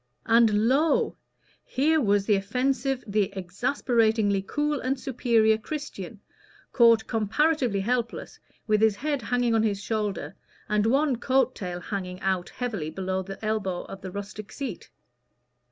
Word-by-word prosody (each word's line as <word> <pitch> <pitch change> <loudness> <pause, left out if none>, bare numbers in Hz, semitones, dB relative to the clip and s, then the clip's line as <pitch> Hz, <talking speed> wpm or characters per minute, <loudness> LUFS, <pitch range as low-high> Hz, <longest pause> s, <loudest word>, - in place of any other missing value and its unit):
And 225 -2 +4
lo! 290 +5 +2 0.5
here 310 +4 +2
was 205 -3 +2
the 210 - +3
offensive, 255 +6 0
the 205 -1 0
exasperatingly 220 +1 +1
cool 295 +8 -1
and 255 +1 -1
superior 230 -4 +2
Christian, 230 - -6 0.5
caught 230 -2 +5
comparatively 235 0 +1
helpless, 235 +2 -2 0.3
with 215 -1 +2
his 220 -2 +4
head 285 +4 -2
hanging 245 0 +1
on 225 - +3
his 205 -3 0
shoulder, 210 -1 -3 0.3
and 210 0 +1
one 270 +1 +2
coat 255 +1 +2
tail 180 -5 -5
hanging 185 -1 -5
out 190 -2 -1
heavily 215 -11 -4
below 190 +3 -2
the 195 +3 -8
elbow 200 -5 -1
of 195 - -10
the 190 - -6
rustic 200 +1 -7
seat. 270 -10 -6
220 Hz, 135 wpm, -26 LUFS, 200-255 Hz, 0.5 s, caught